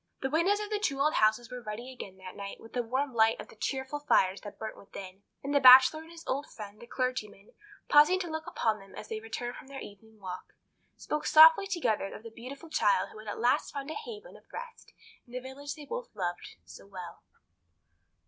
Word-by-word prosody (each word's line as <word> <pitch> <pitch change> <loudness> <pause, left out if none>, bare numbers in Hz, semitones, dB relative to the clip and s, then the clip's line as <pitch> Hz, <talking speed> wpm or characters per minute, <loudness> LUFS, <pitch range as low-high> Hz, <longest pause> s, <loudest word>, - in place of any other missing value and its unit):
The 265 - -1
windows 360 +7 +3
of 420 0 -5
the 420 - 0
two 280 -10 -1
old 300 +3 +3
houses 220 +2 +2
were 250 0 -6
ruddy 235 +4 -7
again 190 -6 -9
that 185 -1 -10
night 200 -1 -7
with 225 - -14
the 245 - 0
warm 260 +3 -2
light 225 0 +3
of - - -9
the - - -15
cheerful 265 +5 -3
fires 195 -9 +2
that 205 - -9
burnt 220 0 -6
within; 195 -1 -10 0.2
and 280 +1 -2
the 285 - +5
Bachelor 260 +3 +9
and 320 - -14
his 335 -1 -12
old 280 +3 -2
friend, 210 -1 -10
the 235 - -11
clergyman, 240 -6 -3 0.3
pausing 300 +6 +6
to 355 - -4
look 315 -1 -5
upon 220 -2 0
them 195 0 -15
as 215 - -9
they 220 - -3
returned 230 +2 -5
from 280 - -12
their 275 0 -8
evening 215 +2 -13
walk, 185 -2 -8 0.4
spoke 300 - -3
softly 320 +5 +8
together 235 - -1
of - - -11
the 230 - -9
beautiful 275 +8 -10
child - - +2
who - - -12
had 215 - -12
at 205 - -4
last 240 +2 +2
found 280 +1 -5
a - - -3
haven 450 +3 -8
of - - -19
rest 480 0 -9 0.4
in 240 - -17
the 250 - -2
village 275 +3 -7
they 300 -2 -10
both 485 +7 -6
loved 175 -2 -4
so - - -13
well. 185 -3 -9
255 Hz, 225 wpm, -30 LUFS, 215-300 Hz, 0.4 s, Bachelor